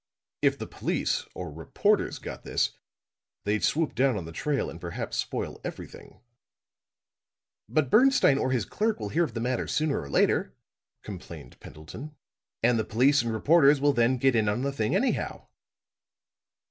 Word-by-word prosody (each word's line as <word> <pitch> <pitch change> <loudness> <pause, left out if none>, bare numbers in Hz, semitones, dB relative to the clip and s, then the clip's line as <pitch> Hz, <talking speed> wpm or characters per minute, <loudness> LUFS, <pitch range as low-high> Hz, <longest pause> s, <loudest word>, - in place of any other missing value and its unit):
If - - +3
the - - -5
police - - -2
or 90 -4 -6
reporters 80 +1 0
got - - -8
this, - - 0 0.7
they'd 105 +1 0
swoop 160 0 +1
down 130 -1 +2
on 90 - -5
the 80 - -8
trail 140 - -1
and 85 - -9
perhaps 85 -1 -5
spoil - - -3
everything!" - - -9 1.5
"But 155 -5 +1
Bernstine 250 - +5
or - - 0
his 125 -7 0
clerk 220 0 -1
will 105 - -4
hear 165 +10 +2
of 120 - -9
the - - -2
matter 125 +1 -1
sooner 150 -1 0
or 70 - -9
later," 65 -2 +1 0.5
complained - - -10
Pendleton. 115 - -10 0.5
"And 120 -1 +3
the - - +1
police 130 +7 +3
and 115 - -3
reporters 145 +5 +4
will 145 +1 +3
then 120 +1 +2
get 130 0 +2
in 110 -2 +2
on 110 +5 -1
the 140 - 0
thing 110 +5 0
anyhow." 250 +7 -1
125 Hz, 160 wpm, -27 LUFS, 105-145 Hz, 1.5 s, Bernstine